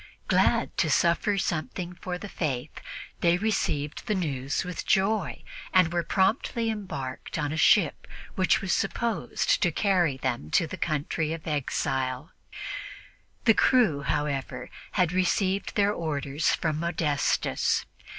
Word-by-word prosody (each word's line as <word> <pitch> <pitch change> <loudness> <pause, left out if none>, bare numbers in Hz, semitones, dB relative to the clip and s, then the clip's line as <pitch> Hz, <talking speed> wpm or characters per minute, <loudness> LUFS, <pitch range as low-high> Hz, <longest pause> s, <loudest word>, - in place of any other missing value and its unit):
Glad - - +2
to - - +2
suffer 185 +4 +2
something 175 0 -2
for 180 0 -5
the 205 - -7
Faith, 140 -10 -3 0.4
they 170 0 +3
received 155 -8 -1
the 215 - +1
news 140 -6 -1
with 180 -2 -5
joy 195 -3 +1 0.3
and 180 -2 +5
were 175 - +2
promptly 225 - +1
embarked 155 -14 -5
on 145 -2 -1
a - - -2
ship 160 +1 +3 0.3
which 185 -1 +2
was 190 -3 0
supposedly 235 -3 -1 0.3
to 175 - +3
carry 175 -6 +2
them 120 - -3
to 165 - +3
the 160 - -6
country 155 -1 -1
of 165 -1 -6
their 155 - -1
exile. 130 0 -2 1.1
The 225 - +7
crew, 215 - +3
however, 140 -1 -2 0.2
had 180 -4 +2
received 185 +2 0
their 205 0 +3
orders 145 -3 -1
from 155 -2 -1
Modestus. 155 -4 0
170 Hz, 135 wpm, -27 LUFS, 145-190 Hz, 1.1 s, The